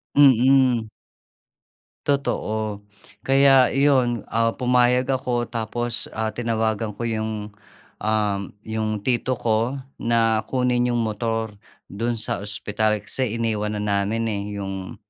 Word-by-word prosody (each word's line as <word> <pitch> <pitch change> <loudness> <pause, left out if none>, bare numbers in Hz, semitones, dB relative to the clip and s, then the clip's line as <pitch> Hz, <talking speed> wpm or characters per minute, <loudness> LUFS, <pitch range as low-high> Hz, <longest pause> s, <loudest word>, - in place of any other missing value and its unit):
Mm. 130 -4 +5 1.2
Totoo. 110 -7 -1 0.5
Kaya 135 -1 +6
iyon, 130 -6 +3
ah, 115 0 +1
pumayag 125 0 +3
ako, 125 -2 0
tapos, 120 +1 -2
ah, 110 0 -1
tinawagan 110 -2 -1
ko 120 - -5
'yong, 110 -2 -3 0.5
um, 105 -2 0 0.2
'yong 110 -2 -3
Tito 130 0 0
ko, 115 +3 0 0.2
na 115 -1 +2
kunin 125 -1 +1
'yong 120 -1 0
motor, 110 0 -2 0.4
do'n 115 +4 -1
sa 110 - -3
ospital 105 +1 -1
kasi 115 0 -2
iniwan 105 -2 -1
na 105 - -3
namin, 105 +2 0
eh, 100 -1 -2
'yong 95 -1 -5
115 Hz, 115 wpm, -23 LUFS, 105-125 Hz, 1.2 s, Kaya